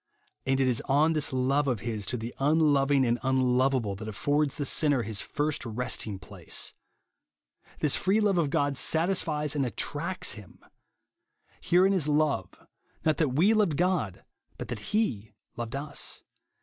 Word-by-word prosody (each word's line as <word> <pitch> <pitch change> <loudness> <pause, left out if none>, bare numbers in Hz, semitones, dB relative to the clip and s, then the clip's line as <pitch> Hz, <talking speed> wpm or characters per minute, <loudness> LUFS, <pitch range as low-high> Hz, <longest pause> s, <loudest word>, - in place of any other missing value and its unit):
And 135 0 +2
it 135 - +3
is 125 -2 +1
on 150 +4 +3
this 150 -2 0
love 135 +3 +1
of 120 -6 -1
his 110 -4 -4
to 125 - -2
the 115 +1 -6
unloving 145 -2 +3
and 120 0 +1
unloveable 130 -4 +1
that 110 +1 -7
affords 145 +7 0
the 145 - -2
sinner 145 -4 +2
his 105 0 -3
first 150 0 -2
resting 110 -3 -3
place. - - -4 1.1
This 150 - +2
free 195 +3 +2
love 200 -4 +2
of 155 -4 +1
God 145 -1 0
satisfies 160 -3 +1
and 140 - +1
attracts 170 - -1
him. 105 -4 -11 0.5
" - - -38
Herein 185 +3 +3
is 175 -6 +1
love, 150 - +1 0.6
not 155 -3 +2
that 145 -6 0
we 180 +9 +4
loA^ed 205 -8 +2
God, 175 - -1 0.3
but - - -7
that 120 -3 -4
he 110 - -1 0.2
loved 120 +1 -5
us." 140 +1 -2
140 Hz, 160 wpm, -28 LUFS, 120-155 Hz, 1.1 s, we